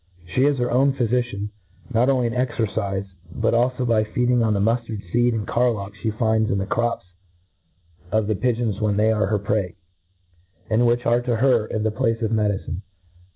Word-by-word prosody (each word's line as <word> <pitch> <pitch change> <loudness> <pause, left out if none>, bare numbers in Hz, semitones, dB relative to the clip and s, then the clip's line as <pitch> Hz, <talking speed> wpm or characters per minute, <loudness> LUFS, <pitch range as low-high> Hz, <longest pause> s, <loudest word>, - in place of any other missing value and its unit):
She 130 - +3
is 145 -1 +2
her 120 -1 0
owa 135 +3 +3
phyfician, 120 -4 -1 0.4
not 120 +4 +3
only 130 -3 +2
in 115 - -1
cxercife, 110 -5 -1 0.3
but 115 +5 0
alfo 125 +2 +1
by 110 -2 +3
feed 120 +3 0
ing 120 -1 +3
on 110 -2 +2
the - - 0
muftard 115 0 -1
feed 120 0 +2
and 105 -2 -2
carlock 110 -5 0
flie 110 - -3
finds 110 0 +1
iii, 100 - 0
the 95 - -1
crops 115 0 -1 1.1
of 110 0 +2
the 110 - 0
pigeons 115 -2 -1
when 105 -1 +1
they 110 +1 +3
are 105 -3 +1
her 105 +1 +1
prey^ 100 -3 -1 1.0
and 120 +2 +3
which 120 +1 +1
are 120 +1 +3
to 120 -1 -1
her 120 -2 +2
in 110 - -2
the 110 - +1
place 115 0 0
of 110 - 0
medicine.. 100 -6 -1
115 Hz, 195 wpm, -22 LUFS, 105-120 Hz, 1.1 s, She